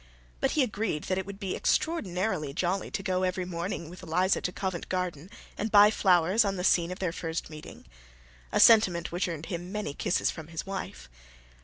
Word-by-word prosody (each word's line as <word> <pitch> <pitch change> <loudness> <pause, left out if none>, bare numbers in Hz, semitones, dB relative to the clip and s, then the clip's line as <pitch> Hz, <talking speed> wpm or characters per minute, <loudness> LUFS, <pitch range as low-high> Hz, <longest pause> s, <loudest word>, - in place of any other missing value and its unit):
But - - +1
he 300 - +3
agreed 210 -9 -2
that 185 0 -1
it 190 - -5
would 200 0 -8
be 195 -3 -3
extraordinarily 190 - -1
jolly 185 +2 -1
to 195 - -4
go 185 -1 0
early 185 0 +1
every 185 0 -2
morning 170 -1 -4
with 180 +3 -11
Eliza 180 +2 +1
to 180 - -2
Covent 185 -2 -4
Garden 180 -3 -3 0.3
and 215 - -1
buy 210 0 +8
flowers 185 +1 +3
on 200 -1 -1
the 180 - -4
scene 170 -2 +3
of 185 - -5
their 185 -4 -1
first 165 -2 -4
meeting: 155 0 -11 0.7
a - - +1
sentiment 185 -7 +5
which 175 +2 -1
earned 165 -2 -5
him 175 +1 -5
many 210 -8 -3
kisses 175 - 0
from 160 -2 -9
his 165 -1 -6
wife. 190 - -6
185 Hz, 200 wpm, -28 LUFS, 170-195 Hz, 0.7 s, buy